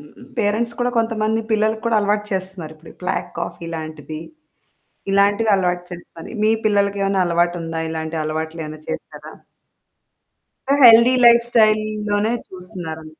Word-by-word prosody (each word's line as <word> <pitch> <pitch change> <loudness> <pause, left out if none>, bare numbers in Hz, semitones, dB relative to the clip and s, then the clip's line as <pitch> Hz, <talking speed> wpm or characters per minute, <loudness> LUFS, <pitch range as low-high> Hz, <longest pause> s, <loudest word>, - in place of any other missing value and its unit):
హ్మ్. 150 +12 -16
పేరెంట్స్ 225 +2 0
కూడా 245 - +1
కొంతమంది 225 -1 0
పిల్లలకు 220 +1 +1
కూడా 230 -1 +2
అలవాటు 210 0 0
చేస్తున్నారు. 185 -4 -4
ఇప్పుడు 160 +1 -15
బ్లాక్ 180 - -2
కాఫి 170 0 -5
లాంటిది. 155 -1 -7 0.9
ఇలాంటివి 205 +3 +3
అలవాటు 180 -2 -1
చేస్తున్నారు. 175 +4 -10
మీ 215 - +4 0.2
పిల్లలకేమైనా 200 -1 +1
అలవాటుందా? 170 -1 -1
ఇలాంటి 160 0 -4
అలవాట్లేమైనా 155 0 -5
చేసారా? - - -7 1.4
ఆహ్, 285 0 +2
హెల్తీ 235 +2 +7
లైఫ్‌స్టైల్‌ 235 -2 +5 0.3
లోనే 205 +2 +1 0.2
చూస్తున్నారా? 175 -3 -8
195 Hz, 120 wpm, -20 LUFS, 165-220 Hz, 1.4 s, హెల్తీ